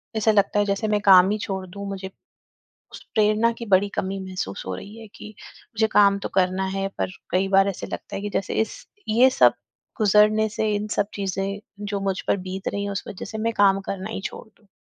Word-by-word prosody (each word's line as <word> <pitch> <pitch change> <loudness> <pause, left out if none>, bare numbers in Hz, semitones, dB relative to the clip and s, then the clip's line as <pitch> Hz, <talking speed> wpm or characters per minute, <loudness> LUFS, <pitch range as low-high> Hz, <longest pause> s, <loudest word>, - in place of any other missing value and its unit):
ऐसा 220 0 +3
लगता 205 0 +2
है 205 - +3
जैसे 200 +2 -1
मैं 210 -1 +1
काम 190 -2 +7
ही 215 - 0
छोड़ 190 -2 -4
दूँ। 200 +2 -8
मुझे 190 -1 -5 0.8
उस - - -10
प्रेरणा 215 +2 +3
की 235 - -6
बड़ी 200 0 +3
कमी 195 +1 -2
महसूस 185 - -5
हो 95 - -3
रही 205 - -9
है 225 - -10
कि - - -10 0.5
मुझे 220 0 +2
काम 200 -1 +5
तो - - -5
करना 185 0 +1
है 195 0 -1
पर - - -1 0.2
कई 190 +1 +1
बार 195 +1 +5
ऐसे 190 - -4
लगता - - -7
है - - -4
कि 205 - -3
जैसे 195 - -1
इस 220 - -4 0.2
ये 245 +4 +5
सब - - +7 0.4
गुज़रने 215 0 +4
से 220 0 +1
इन 205 +1 -2
सब 205 - +2
चीज़ें 195 0 -3 0.3
जो 200 -1 -3
मुझ 195 -1 -1
पर - - +3
बीत 190 +1 -4
रही 200 0 -3
है 200 - -3
उस 195 - -4
वज़ह 190 - -7
से 220 - -6
मैं - - -1
काम 195 -1 +4
करना 195 +2 -4
ही 220 - -4
छोड़ - - -6
दूँ। 210 -1 -30
200 Hz, 225 wpm, -23 LUFS, 195-215 Hz, 0.8 s, काम